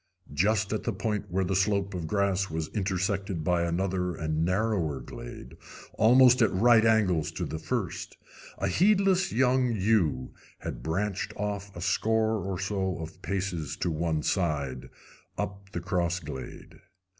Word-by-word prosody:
Just 100 +6 +1
at 110 - -1
the - - -2
point 105 -3 -2
where 95 +2 0
the 95 +1 -1
slope 100 0 +1
of 85 -3 -4
grass 100 0 +1
was 80 0 -3
intersected 95 -3 -1
by 90 +1 +2
another 90 +1 -1
and 80 0 -1
narrower 90 -6 0
glade, - - -9 0.4
almost 125 +3 +6
at 110 - +4
right 110 +4 +5
angles 100 -9 +3
to - - -3
the 80 - -5
first, 80 - -3 0.4
a 95 - -1
heedless 190 - +3
young 125 0 +2
ewe 95 - +1 0.2
had - - -6
branched 95 +8 -2
off 100 -1 -3
a 85 - -7
score 110 +3 +1
or 95 -1 -3
so 95 -1 -1
of 80 0 -8
paces 90 -6 -3
to 85 - -1
one 80 -1 -1
side, 70 -8 -1 0.5
up 100 0 -5
the - - -3
cross 85 -1 -1
glade. 75 -5 -9
95 Hz, 150 wpm, -28 LUFS, 85-105 Hz, 0.5 s, almost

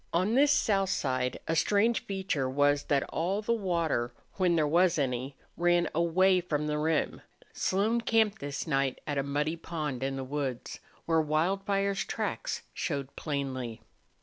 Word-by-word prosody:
On 185 +6 +2
this 285 +3 +5
south 195 -8 +2
side 130 -7 -1
a 165 - +1
strange 210 +7 +2
feature 190 -9 -1
was 145 +1 +2
that 140 -2 +2
all 190 +6 -1
the 235 - +1
water, 170 - 0 0.3
when 180 -3 +3
there 155 -2 +3
was 170 +3 +3
any, 130 -1 -2 0.2
ran 175 0 +3
away 180 +3 +3
from 150 -4 -2
the 150 0 -1
rim. 155 0 0 0.3
Slone 215 +5 +1
camped 220 -2 +2
this 140 0 -4
night 135 -3 0
at 145 -2 -1
a - - +3
muddy 145 +3 -1
pond 155 -6 -4
in 135 0 -1
the 135 - -4
woods, 135 -2 -4 0.3
where 165 -1 +3
Wildfire's 195 +6 0
tracks - - -3
showed 140 -4 -3
plainly. 130 -6 -3
160 Hz, 155 wpm, -29 LUFS, 140-190 Hz, 0.3 s, this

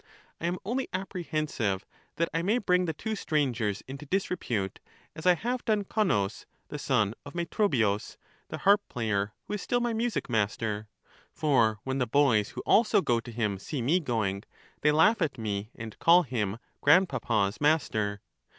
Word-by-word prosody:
I 170 - -2
am 175 +1 -1
only 255 +6 -1
apprehensive 155 - -2 0.3
that 170 - +1
I 165 - +1
may 205 +7 +2
bring 180 -5 +2
the 160 - -2
two 220 +8 -4
strangers 125 - -1
into 140 +2 -8
disrepute, 130 - -2 0.4
as 155 - -4
I 180 - +7
have 245 +6 -3
done 215 -3 +1
Connus 185 - 0 0.2
the - - -5
son 105 0 +1
of 145 +3 -11
Metrobius, 135 - 0 0.3
the - - -5
harp 200 +1 +4
player, 110 -4 -1
who - - -6
is 210 - -2
still 245 - 0
my 240 -1 0
music 230 +1 -1
master; 105 -1 -1 0.4
for 115 -8 +2
when 135 0 -2
the 125 - +1
boys 115 -5 +3
who - - -6
also 215 -3 +4
go 120 -1 +2
to 120 - -9
him 105 -4 -1
see 140 +8 -5
me 160 +9 +3
going, 110 - -1 0.4
they 150 - +4
laugh 185 +8 +4
at 155 -5 0
me 105 -2 -3
and 110 -2 -8
call 175 +2 +6
him 110 - -2 0.2
grandpapa's 120 - +3
master. 110 -10 +1
140 Hz, 170 wpm, -28 LUFS, 110-180 Hz, 0.4 s, I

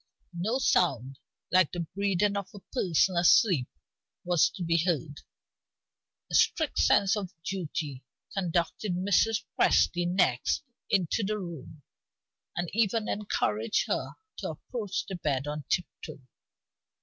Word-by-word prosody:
No 200 +9 -1
sound 135 - +1 0.3
like 185 -3 +4
the 175 - -2
breathing 200 +3 0
of 200 -2 -3
a - - -8
person 185 - +2
asleep 170 - +4 0.6
was 175 -3 +3
to 185 - -7
be 165 0 +2
heard. 160 -4 -2 1.1
A - - -8
strict 315 -4 +2
sense 195 +1 +4
of 200 -4 -4
duty 155 -8 -4 0.3
conducted 180 +1 -1
Mrs. 205 +4 +2 0.2
Presty 175 0 +3
next 175 - +1 0.3
into 195 +2 +1
the 210 +2 -1
room, 160 -5 -8 0.7
and 175 0 -2
even 220 0 +1
encouraged 115 - 0
her - - -2 0.2
to - - -4
approach 210 -7 -4
the 195 - -7
bed 140 -5 -1
on 150 0 -5
tip 180 - +1 0.2
toe. 155 - -8
180 Hz, 125 wpm, -29 LUFS, 155-200 Hz, 1.1 s, like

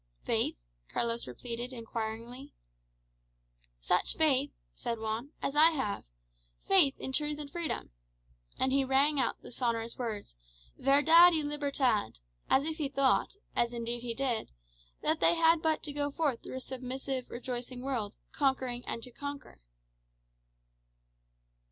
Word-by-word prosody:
"Faith?" - - +1 0.3
Carlos 235 0 -1
repeated 235 - -5
inquiringly. 230 +2 -6 1.2
"Such - - +2
faith," 290 -3 +4 0.2
said 235 -1 -3
Juan, 220 +4 -3
"as 275 - -1
I 310 +2 +8
have. 265 -11 -2 0.6
Faith 340 -9 +5
in 265 - -4
truth 295 +1 0
and 290 -1 -7
freedom?" 340 - -3 0.7
And 260 - +1
he 275 0 +3
rang 275 +2 +3
out 255 - 0
the - - -10
sonorous 230 -2 -2
words, 220 - -4 0.4
"Verdad 320 +6 +6
y 315 - +1
libertad," 280 - 0 0.3
as 275 - +4
if 320 0 -3
he 295 -4 -2
thought, 275 +5 +2 0.2
as 240 0 +1
indeed 235 0 -2
he 235 -1 -3
did, 250 -3 -1 0.5
that 315 +1 +1
they - - +4
had 330 -1 +4
but 315 -1 +1
to 295 - -3
go 290 0 0
forth 285 -4 -1
through - - -8
a 260 - -4
submissive, 260 0 -5
rejoicing 245 0 -5
world, 235 -6 -2 0.2
"conquering 260 -3 0
and 230 - -4
to 250 - -9
conquer." 285 - -8
265 Hz, 140 wpm, -31 LUFS, 235-290 Hz, 1.2 s, I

